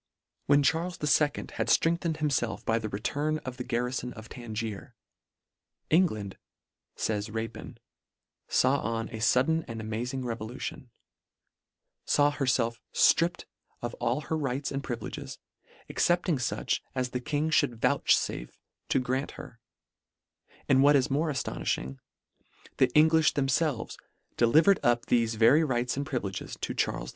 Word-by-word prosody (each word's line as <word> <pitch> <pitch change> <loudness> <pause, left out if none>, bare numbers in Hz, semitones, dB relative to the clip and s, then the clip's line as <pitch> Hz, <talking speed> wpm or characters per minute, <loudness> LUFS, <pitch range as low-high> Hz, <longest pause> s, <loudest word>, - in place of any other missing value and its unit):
When 145 0 +5
Charles 165 +5 +1
II. 150 0 +3
had - - -4
ftrengthened 165 -1 +2
himfelf 140 -7 -1
by 115 0 +2
the 110 -1 -4
return 145 +9 -1
of 130 -1 -6
the 125 - -4
garrifon 125 0 -2
of 110 0 -11
Tangier, 115 0 -6 0.5
" - - -57
England 110 - -1 0.6
(fays 105 -1 -1
Rapin) 110 +1 -6 0.7
faw 135 +2 +3
on 115 -2 -3
a 110 - -7
fudden 135 +9 +2
an 115 -1 -6
amazing 120 +4 -4
revolution; 120 +2 -5 1.2
faw 145 0 +4
herfelf 125 -5 0
stripped 175 +2 +3 0.4
of 120 0 -3
all 120 +5 0
her 160 - -3
rights 140 -2 -2
and 140 0 -3
privi 120 -4 -4
leges, - - -7 0.5
excepting 175 -2 +1
fuch 125 - -1 0.2
as 125 -1 -1
the 125 - -2
King 150 +5 -1
Ihould 145 -6 +2
vouchfafe 85 - +1 0.4
to - - +3
grant 130 +2 -2
her; 115 - -10 1.1
and 135 0 +5
what 145 +1 +6
is 135 0 +2
more 155 +4 +1
aftonifhing, 65 - -3 0.8
the 130 - +5
Engliih 160 0 +5
themfelves 135 -2 0 0.4
delivered 160 +12 +5
up 120 0 +2
thefe 115 -2 +1
very 115 +8 +5
rights 125 -4 0
and 140 +1 -3
privileges 105 -10 -4
to - - -2
Char - - -1
les - - -6
II. - - -8
125 Hz, 140 wpm, -28 LUFS, 115-145 Hz, 1.2 s, what